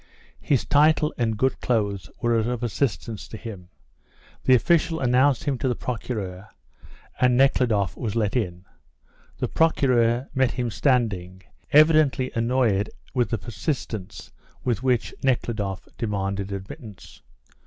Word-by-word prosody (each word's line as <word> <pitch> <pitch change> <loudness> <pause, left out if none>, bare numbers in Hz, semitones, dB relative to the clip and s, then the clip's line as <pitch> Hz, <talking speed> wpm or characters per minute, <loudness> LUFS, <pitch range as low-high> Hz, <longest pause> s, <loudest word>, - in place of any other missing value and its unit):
His 135 -5 +1
title 150 +1 +3
and 115 -3 -1
good 130 +4 0
clothes 100 -5 -1
were 120 0 +2
of 120 +2 -2
assistance 115 -3 -2
to 110 - -8
him. 100 -6 -9 0.8
The 130 - +6
official 165 +4 +2
announced 130 +1 +3
him 140 -4 -1
to 135 - -1
the 125 - 0
Procureur, 105 -6 -5 0.7
and 125 -1 +4
Nekhludoff 120 -8 +2
was 110 -3 -4
let 110 -2 0
in. 90 -6 -2 0.7
The - - -1
Procureur 125 -6 +2
met 130 -2 +2
him 120 -2 -2
standing, 100 -6 0 0.3
evidently 150 -4 +4
annoyed 115 -3 +1 0.3
at 125 -2 +1
the 115 - 0
persistence 110 - -5 0.3
with 120 -4 0
which 125 -3 0
Nekhludoff 110 -7 -1
demanded 100 -3 -2
admittance. 100 +1 -9
120 Hz, 125 wpm, -24 LUFS, 105-130 Hz, 0.8 s, The